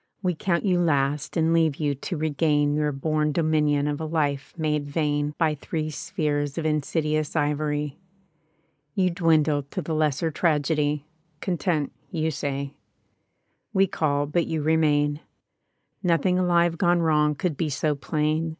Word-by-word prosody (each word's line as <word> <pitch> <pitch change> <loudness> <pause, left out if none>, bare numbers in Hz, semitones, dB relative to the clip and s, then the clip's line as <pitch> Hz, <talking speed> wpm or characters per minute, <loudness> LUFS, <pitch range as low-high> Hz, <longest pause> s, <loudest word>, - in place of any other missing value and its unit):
We 180 -1 +1
count 170 +3 -1
you 180 -3 +3
last 145 -2 0
and 165 0 +3
leave 160 -3 +3
you 145 -1 0
to 150 +5 -5
regain 150 -1 +1
Your 150 0 +1
bom 150 +2 0
dominion 150 -3 +2
of 145 +1 -2
a - - -2
life 145 -3 -1
made 150 -2 -1
vain 145 0 -1
By 160 -3 +2
three 155 +1 -4
spheres 150 -4 -2
of 165 - -2
insidious 155 0 0
ivory. 150 -1 -1 1.0
You 185 -2 +2
dwindle 160 -4 +2
to 140 - -6
the 160 - -3
lesser 155 +1 +1
tragedy 150 -2 +1 0.2
— 165 -3 -42
Content, 170 -5 -1 0.2
you 160 -4 -1
say. 140 -1 -3 1.0
We 195 0 +5
call, 145 -5 0
but 165 +4 0
you 160 -2 -2
remain. 150 -2 +2 0.8
Nothing 180 +1 +2
alive 170 -2 +2
gone 175 -2 +3
wrong 150 -2 +3
could 165 +1 -2
be 155 +2 -1
so 150 +2 0
plain. 155 +3 -1
155 Hz, 150 wpm, -25 LUFS, 145-165 Hz, 1.0 s, We